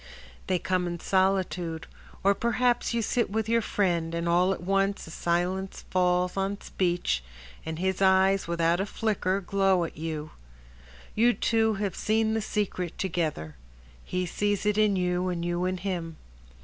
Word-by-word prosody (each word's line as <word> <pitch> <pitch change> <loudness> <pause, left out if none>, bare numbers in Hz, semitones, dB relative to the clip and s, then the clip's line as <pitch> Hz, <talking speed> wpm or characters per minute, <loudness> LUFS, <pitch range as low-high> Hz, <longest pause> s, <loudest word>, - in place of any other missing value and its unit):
They 185 - +2
come 180 +1 0
in 170 0 -4
solitude, 185 -3 0 0.4
or 200 +1 +5
perhaps 240 +3 +1
You 235 -1 0
sit 240 +2 0
with 220 +1 -1
your 230 +1 +3
friend, 170 -6 0
and 170 0 -2
all 175 +2 +3
at 185 - -3
once 195 +1 0
A 160 - -10
silence 180 +3 -1
falls 180 0 +2
on 195 +1 -1
speech, 175 - -1 0.4
and 160 0 -3
his 190 +2 -1
eyes 190 0 +4
Without 170 0 +1
a 195 - -1
flicker 200 -3 -1
glow 195 -1 +2
at 165 - -6
you:— 155 -1 -4 0.8
You 240 +3 +4
two 220 -1 +2
have 200 -2 -2
seen 220 0 +1
the 225 - 0
secret 195 -5 -2
together, 155 - -2 0.5
He 180 0 -2
sees 205 +3 -1
it 210 0 +2
in 210 -2 +4
you, 180 0 0
and 170 -1 -2
you 175 +1 -1
in 185 0 -1
him. 175 -4 -4
185 Hz, 160 wpm, -27 LUFS, 175-200 Hz, 0.8 s, or